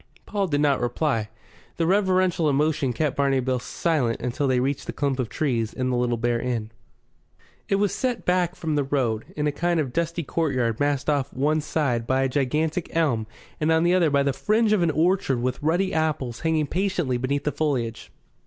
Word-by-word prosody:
Paul 200 Hz, -2 st, -1 dB
did 145 Hz, -3 st, 0 dB
not 145 Hz, -3 st, +2 dB
reply, 120 Hz, -3 st, 0 dB, 0.5 s
and 165 Hz, -, +1 dB
reverential 185 Hz, -4 st, +2 dB
emotion 145 Hz, -1 st, +1 dB
kept 140 Hz, +4 st, -1 dB
Barney 140 Hz, -1 st, +2 dB
Bill 130 Hz, 0 st, 0 dB
silent 130 Hz, -4 st, -1 dB
until 125 Hz, +4 st, -1 dB
they 130 Hz, -1 st, +2 dB
reached 135 Hz, +2 st, -2 dB
the -, -, -4 dB
clump 140 Hz, -2 st, -1 dB
of 120 Hz, -4 st, -1 dB
trees 120 Hz, -7 st, -1 dB
and 130 Hz, 0 st, -1 dB
the -, -, 0 dB
Little 120 Hz, -1 st, 0 dB
Bear 120 Hz, 0 st, 0 dB
Inn. 115 Hz, -3 st, -3 dB, 1.0 s
It 195 Hz, -, +3 dB
was 200 Hz, 0 st, +1 dB
set 250 Hz, -3 st, -2 dB
back 180 Hz, 0 st, +1 dB
from 160 Hz, -2 st, -3 dB
the 145 Hz, -1 st, +1 dB
road, 125 Hz, -6 st, -1 dB
in 150 Hz, -, 0 dB
a 150 Hz, -, +2 dB
kind 170 Hz, +3 st, 0 dB
of 135 Hz, -5 st, -2 dB
dusty 170 Hz, 0 st, -1 dB
courtyard 130 Hz, -8 st, -1 dB
masked 145 Hz, -1 st, 0 dB
off 140 Hz, -2 st, 0 dB
on -, -, -8 dB
one 155 Hz, +3 st, +2 dB
side 130 Hz, -7 st, -1 dB
by 130 Hz, 0 st, +2 dB
a 135 Hz, -, +1 dB
gigantic 150 Hz, +5 st, -1 dB
elm 130 Hz, -10 st, +1 dB, 0.3 s
and 155 Hz, +1 st, +1 dB
on 160 Hz, 0 st, +3 dB
the 175 Hz, +1 st, +3 dB
other 175 Hz, -4 st, +4 dB
by 140 Hz, -1 st, +2 dB
the 140 Hz, -1 st, +1 dB
fringe 215 Hz, -, +2 dB
of 205 Hz, -, +2 dB
an 170 Hz, -, +3 dB
orchard 160 Hz, -4 st, +1 dB
with 125 Hz, +1 st, -2 dB
ruddy 175 Hz, +5 st, +1 dB
apples 150 Hz, -7 st, -1 dB
hanging 160 Hz, -2 st, +1 dB
patiently 175 Hz, -6 st, -1 dB
beneath 140 Hz, +3 st, -1 dB
the 150 Hz, -, 0 dB
foliage. 130 Hz, -8 st, -2 dB
145 Hz, 205 wpm, -24 LUFS, 130-165 Hz, 1.0 s, other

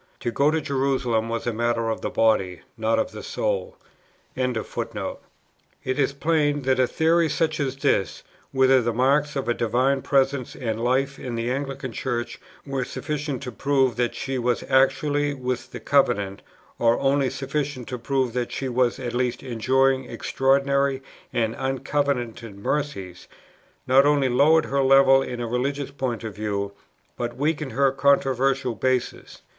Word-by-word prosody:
To 120 Hz, -, -1 dB
go 140 Hz, +5 st, +3 dB
to 160 Hz, +1 st, +1 dB
Jerusalem 130 Hz, -5 st, 0 dB
was 115 Hz, 0 st, -3 dB
a 120 Hz, -, -1 dB
matter 115 Hz, 0 st, 0 dB
of -, -, -4 dB
the -, -, -2 dB
body, 95 Hz, -5 st, +1 dB
not 110 Hz, 0 st, +1 dB
of -, -, 0 dB
the -, -, -8 dB
soul. -, -, -2 dB, 0.6 s
It 125 Hz, -2 st, -1 dB, 1.4 s
is 140 Hz, 0 st, +2 dB
plain, 145 Hz, -1 st, +1 dB
that 130 Hz, 0 st, +1 dB
a 130 Hz, -, +4 dB
theory 165 Hz, +2 st, +2 dB
such 155 Hz, 0 st, 0 dB
as 135 Hz, -2 st, -1 dB
this, 135 Hz, -8 st, 0 dB, 0.3 s
whether 130 Hz, -1 st, +4 dB
the 120 Hz, 0 st, -1 dB
marks 140 Hz, +4 st, +2 dB
of 135 Hz, -3 st, -2 dB
a 120 Hz, -, +2 dB
divine 130 Hz, +4 st, +1 dB
presence 135 Hz, -2 st, +1 dB
and 115 Hz, -3 st, -3 dB
life 135 Hz, +3 st, 0 dB
in 125 Hz, -2 st, -5 dB
the 115 Hz, +1 st, -2 dB
Anglican 135 Hz, -1 st, -4 dB
Church 120 Hz, 0 st, -3 dB, 0.3 s
were 135 Hz, -2 st, -2 dB
sufficient 145 Hz, 0 st, -4 dB
to 125 Hz, -, -5 dB
prove 135 Hz, -1 st, +1 dB
that 120 Hz, -1 st, 0 dB
she 135 Hz, -1 st, -3 dB
was 120 Hz, 0 st, 0 dB
actually 145 Hz, +2 st, +2 dB
within 125 Hz, -1 st, -3 dB
the -, -, -7 dB
covenant, 100 Hz, -8 st, +1 dB, 0.4 s
or 115 Hz, 0 st, +3 dB
only 135 Hz, -1 st, +2 dB
sufficient 140 Hz, -2 st, -3 dB
to 125 Hz, -1 st, -4 dB
prove 130 Hz, -1 st, -1 dB
that 125 Hz, -1 st, -2 dB
she 135 Hz, -, -3 dB
was 125 Hz, -1 st, +1 dB
at 120 Hz, -2 st, -5 dB
least 125 Hz, 0 st, -1 dB
enjoying 130 Hz, +2 st, +1 dB
extraordinary 140 Hz, +1 st, +1 dB, 0.3 s
and 115 Hz, -1 st, 0 dB
uncovenanted 130 Hz, -5 st, -2 dB
mercies, 100 Hz, -7 st, -3 dB, 0.6 s
not 135 Hz, +2 st, +5 dB
only 145 Hz, -3 st, +3 dB
lowered 150 Hz, +6 st, +4 dB
her 140 Hz, 0 st, 0 dB
level 135 Hz, 0 st, +6 dB
in 125 Hz, -2 st, -5 dB
a 120 Hz, -, -2 dB
religious 135 Hz, +4 st, -2 dB
point 130 Hz, -5 st, -3 dB
of 110 Hz, -2 st, -5 dB
view, 100 Hz, -1 st, -2 dB, 0.4 s
but 120 Hz, 0 st, -4 dB
weakened 145 Hz, -2 st, -1 dB
her 135 Hz, +2 st, +3 dB
controversial 135 Hz, -2 st, +2 dB
basis. 130 Hz, +3 st, -2 dB
130 Hz, 160 wpm, -24 LUFS, 120-140 Hz, 1.4 s, level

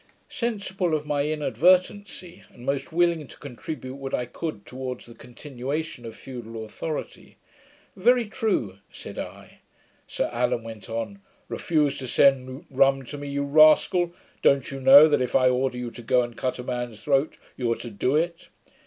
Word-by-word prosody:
Sensible 195 Hz, -8 st, -1 dB
in 150 Hz, -, -14 dB
my 145 Hz, -1 st, 0 dB
inadvertency, 180 Hz, +4 st, +1 dB
and 120 Hz, -, -13 dB
most 140 Hz, +3 st, -2 dB
willing 170 Hz, -3 st, +1 dB
to -, -, -14 dB
contribute 135 Hz, 0 st, -7 dB
what 135 Hz, -1 st, -3 dB
I 125 Hz, -, -2 dB
could 120 Hz, -5 st, -6 dB
towards 130 Hz, -1 st, -6 dB
the 120 Hz, -, -13 dB
continuation 130 Hz, +2 st, -6 dB
of 110 Hz, -, -9 dB
feudal 115 Hz, -4 st, -8 dB
authority, 150 Hz, +8 st, -6 dB, 0.6 s
'Very 240 Hz, +5 st, +3 dB
true,' 205 Hz, -, -2 dB
said -, -, -9 dB
I. -, -, -9 dB, 0.5 s
Sir -, -, -1 dB
Allan 120 Hz, 0 st, 0 dB
went 115 Hz, -1 st, -10 dB
on: 115 Hz, -3 st, -4 dB, 0.3 s
'Refuse 150 Hz, -4 st, 0 dB
to 130 Hz, -, -6 dB
send 130 Hz, +1 st, +2 dB
rum 135 Hz, 0 st, +3 dB
to 145 Hz, -, -7 dB
me, 145 Hz, -, -6 dB
you 140 Hz, 0 st, -1 dB
rascal! 155 Hz, +4 st, +5 dB, 0.3 s
Don't 140 Hz, -1 st, +3 dB
you 135 Hz, -, -5 dB
know 140 Hz, +4 st, +9 dB
that, 150 Hz, -, +2 dB
if 125 Hz, -, -2 dB
I 130 Hz, -1 st, +5 dB
order 125 Hz, 0 st, 0 dB
you 125 Hz, -1 st, -4 dB
to 120 Hz, -, -10 dB
go 125 Hz, +1 st, +3 dB
and 120 Hz, -1 st, -7 dB
cut 130 Hz, +2 st, -2 dB
a 125 Hz, -, -6 dB
man's 120 Hz, -3 st, -5 dB
throat, 140 Hz, +1 st, +1 dB, 0.2 s
you 120 Hz, -3 st, -1 dB
are -, -, +2 dB
to 120 Hz, -, -8 dB
do 125 Hz, +7 st, 0 dB
it?' 170 Hz, +2 st, -1 dB
135 Hz, 170 wpm, -25 LUFS, 125-155 Hz, 0.6 s, know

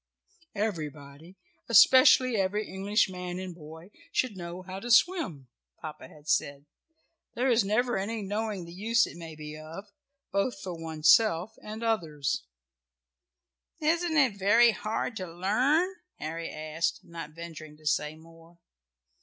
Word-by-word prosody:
"Everybody, 155 Hz, -4 st, -5 dB, 0.3 s
especially 255 Hz, +2 st, +7 dB
every 205 Hz, +2 st, 0 dB
English 200 Hz, +3 st, +1 dB
man 180 Hz, -1 st, -6 dB
and 185 Hz, -1 st, -6 dB
boy, 160 Hz, +3 st, -12 dB, 0.2 s
should 255 Hz, -5 st, 0 dB
know 175 Hz, 0 st, -7 dB
how 185 Hz, +1 st, -7 dB
to 240 Hz, -, -7 dB
swim," 220 Hz, -, +3 dB, 0.3 s
Papa 155 Hz, -1 st, -8 dB
had 150 Hz, 0 st, -17 dB
said. 140 Hz, -1 st, 0 dB, 0.7 s
"There 255 Hz, +2 st, +2 dB
is 235 Hz, -2 st, +4 dB
never 215 Hz, +3 st, +1 dB
any 215 Hz, +2 st, -3 dB
knowing 205 Hz, -2 st, -3 dB
the 170 Hz, -, -11 dB
use 225 Hz, +5 st, +2 dB
it -, -, -10 dB
may 165 Hz, -2 st, -9 dB
be 150 Hz, 0 st, -8 dB
of, 165 Hz, +7 st, -10 dB, 0.4 s
both 200 Hz, +6 st, 0 dB
for 185 Hz, -3 st, -5 dB
one's 160 Hz, -2 st, +2 dB
self 215 Hz, -2 st, +2 dB
and 215 Hz, +2 st, -7 dB
others." 160 Hz, -, -1 dB, 1.3 s
"Isn't 330 Hz, +1 st, +1 dB
it 250 Hz, -9 st, +3 dB
very 230 Hz, +5 st, +6 dB
hard 220 Hz, +2 st, -3 dB
to 185 Hz, -3 st, -6 dB
learn?" 260 Hz, -, +1 dB, 0.2 s
Harry 165 Hz, +2 st, -5 dB
asked, 155 Hz, +2 st, -2 dB
not 165 Hz, -2 st, -9 dB
venturing 160 Hz, -2 st, -9 dB
to 155 Hz, -, -21 dB
say 150 Hz, 0 st, 0 dB
more. 165 Hz, +1 st, -18 dB
185 Hz, 140 wpm, -28 LUFS, 160-220 Hz, 1.3 s, especially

